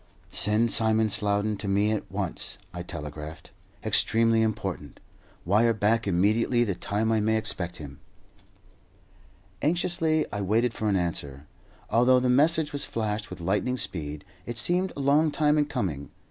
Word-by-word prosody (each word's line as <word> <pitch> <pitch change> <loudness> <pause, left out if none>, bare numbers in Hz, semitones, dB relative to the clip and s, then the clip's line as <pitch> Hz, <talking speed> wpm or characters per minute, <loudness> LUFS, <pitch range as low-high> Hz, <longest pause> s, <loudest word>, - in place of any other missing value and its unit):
"Send 110 +2 +1
Simon 110 -1 +3
Slowden 105 +1 +1
to 100 - -5
me 100 +2 +2
at 110 -4 -3
once" 95 -3 -3 0.2
I 90 - -5
telegraphed. 75 -1 -8 0.3
"Extremely 115 0 +3
important. 100 -9 -3 0.5
Wire 110 +5 +3
back 110 +2 +1
immediately 110 +6 +2
the 105 -4 -1
time 105 +5 -1
I 110 - +2
may 110 +1 +1
expect 90 -5 -2
him." 70 -2 -10 1.6
Anxiously 160 0 +1
I 105 - -2
waited 115 +5 +1
for 110 - -3
an 100 - +2
answer. 75 -6 -3 0.5
Although 125 +2 +4
the 125 0 +1
message 150 +3 +3
was 145 - -1
flashed 110 -1 -3
with - - -8
lightning 105 +8 0
speed, 75 -9 -5 0.2
it 120 -1 -4
seemed 180 +9 0
a - - -7
long 145 +3 +3
time 150 0 +2
in 145 - +2
coming. 75 - -3
110 Hz, 150 wpm, -26 LUFS, 95-125 Hz, 1.6 s, Although